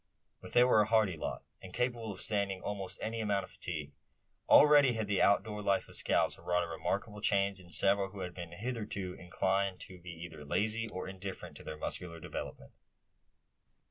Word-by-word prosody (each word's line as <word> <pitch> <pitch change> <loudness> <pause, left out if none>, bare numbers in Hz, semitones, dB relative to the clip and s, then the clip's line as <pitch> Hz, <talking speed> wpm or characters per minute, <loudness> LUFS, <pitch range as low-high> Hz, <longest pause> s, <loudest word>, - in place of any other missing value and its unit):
But - - -10
they 120 - +7
were 125 -4 +5
a 105 - +1
hearty 110 -5 +3
lot, 80 - -4 0.2
and 95 - -10
capable 120 -3 -1
of 95 - -7
standing 100 -3 0
almost 95 -2 -4
any 115 +1 -2
amount 100 -2 +1
of - - -11
fatigue. 75 -4 -5 0.6
Already 145 -3 +8
had 110 -1 -1
the 100 -2 +1
outdoor 105 +1 +3
life 100 -2 +1
of - - -13
scouts - - +1
wrought 90 0 +1
a - - -4
remarkable 100 +5 -3
change 100 -1 +2
in 90 -1 -14
several 95 +4 +4
who 100 0 -8
had 90 -1 -4
been 85 -2 -7
hitherto 105 -3 -4
inclined 95 +2 -1
to 90 -1 -9
be 90 +1 -10
either 80 -2 -8
lazy, 110 +9 0
or 95 - -5
indifferent 95 -4 -7
to - - -11
their 75 - -6
muscular 85 +1 -4
development. 60 - -7
100 Hz, 185 wpm, -33 LUFS, 90-105 Hz, 0.6 s, Already